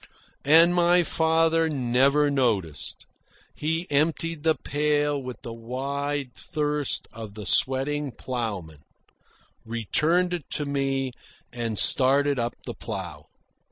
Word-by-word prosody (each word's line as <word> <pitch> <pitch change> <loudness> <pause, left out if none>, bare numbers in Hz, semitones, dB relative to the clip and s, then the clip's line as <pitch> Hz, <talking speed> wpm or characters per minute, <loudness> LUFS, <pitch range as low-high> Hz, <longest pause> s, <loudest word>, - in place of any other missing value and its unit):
And 165 +4 +7
my 175 0 +4
father 165 0 +2
never 140 +2 +2
noticed. 110 - -1 0.5
He 160 +3 -2
emptied 160 +2 0
the 160 0 +3
pail 145 -1 0
with 125 -1 -8
the 115 - -6
wide 135 +3 -3
thirst 150 -3 -2
of 110 -2 -9
the 105 -1 -7
sweating 135 +4 +1
ploughman, 105 - -5 0.8
returned 155 - +1
it 175 -5 -5
to 150 - -1
me, 135 -2 -1 0.4
and 115 -3 -3
started 140 +3 +4
up 120 0 -2
the - - -5
plough. 90 -9 -7
140 Hz, 115 wpm, -25 LUFS, 120-150 Hz, 0.8 s, And